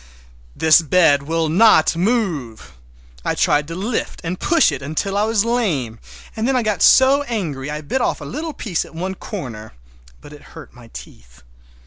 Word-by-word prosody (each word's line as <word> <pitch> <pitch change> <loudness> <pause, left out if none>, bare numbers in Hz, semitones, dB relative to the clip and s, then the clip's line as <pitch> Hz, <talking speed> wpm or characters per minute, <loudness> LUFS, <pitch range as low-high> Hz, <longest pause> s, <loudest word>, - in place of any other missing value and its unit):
This 160 +1 +5
bed 160 -2 +3
will 160 +2 -1
not 170 -1 +4
move! 165 - -2 0.5
I - - -1
tried 145 0 +1
to 165 - -7
lift 215 +6 -3
and 180 +2 -4
push 335 -1 +3
it 135 - -5
until 155 +8 -3
I 205 +1 +1
was 220 -1 +1
lame, 165 - -1 0.4
and 225 +1 -2
then 270 - +1
I 250 - +1
got 210 -3 -2
so 265 +2 +5
angry 155 - -4
I 150 +1 -5
bit 155 - -2
off - - -1
a - - -9
little 310 +4 -5
piece 185 - -3
at - - -16
one 185 +3 -4
corner—but 105 - -11
it 145 - -13 0.2
hurt 155 -6 -12
my 120 -2 -16
teeth. 60 +1 -13
165 Hz, 175 wpm, -19 LUFS, 140-220 Hz, 0.5 s, This